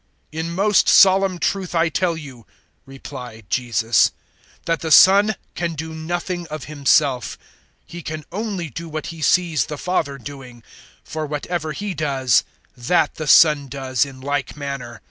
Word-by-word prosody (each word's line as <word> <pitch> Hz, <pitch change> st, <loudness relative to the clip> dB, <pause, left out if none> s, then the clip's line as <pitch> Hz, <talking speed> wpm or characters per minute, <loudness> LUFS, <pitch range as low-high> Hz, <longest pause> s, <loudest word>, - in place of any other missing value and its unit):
005:019 160 Hz, -, -5 dB
"In 165 Hz, +1 st, -3 dB
most 205 Hz, +2 st, +3 dB
solemn 190 Hz, -1 st, +5 dB
truth 185 Hz, 0 st, -2 dB
I 165 Hz, 0 st, +3 dB
tell 170 Hz, +2 st, 0 dB
you," 130 Hz, -7 st, -11 dB, 0.4 s
replied 125 Hz, -5 st, -10 dB
Jesus, 120 Hz, -2 st, +2 dB, 0.5 s
"that 165 Hz, -1 st, 0 dB
the 160 Hz, -, -4 dB
Son 200 Hz, +6 st, +6 dB, 0.2 s
can 170 Hz, -1 st, -3 dB
do 160 Hz, +1 st, -6 dB
nothing 175 Hz, +2 st, -4 dB
of 155 Hz, -2 st, -7 dB
Himself 140 Hz, -3 st, +1 dB, 0.5 s
He 175 Hz, -, -9 dB
can 155 Hz, -2 st, -6 dB
only 200 Hz, -3 st, -3 dB
do 165 Hz, +7 st, -7 dB
what 155 Hz, 0 st, -5 dB
He 165 Hz, -, -11 dB
sees 165 Hz, -1 st, +2 dB
the 150 Hz, -, -6 dB
Father 150 Hz, -5 st, -2 dB
doing; 130 Hz, -3 st, -11 dB, 0.4 s
for 155 Hz, -1 st, -5 dB
whatever 155 Hz, +2 st, -3 dB
He 205 Hz, +6 st, -4 dB
does, 135 Hz, -6 st, +1 dB, 0.3 s
that 150 Hz, +6 st, +1 dB
the 155 Hz, -, -6 dB
Son 150 Hz, -2 st, +6 dB
does 130 Hz, -1 st, -1 dB
in 135 Hz, -2 st, -9 dB
like 140 Hz, 0 st, -3 dB
manner. 140 Hz, -5 st, -6 dB
155 Hz, 155 wpm, -21 LUFS, 135-175 Hz, 0.5 s, Son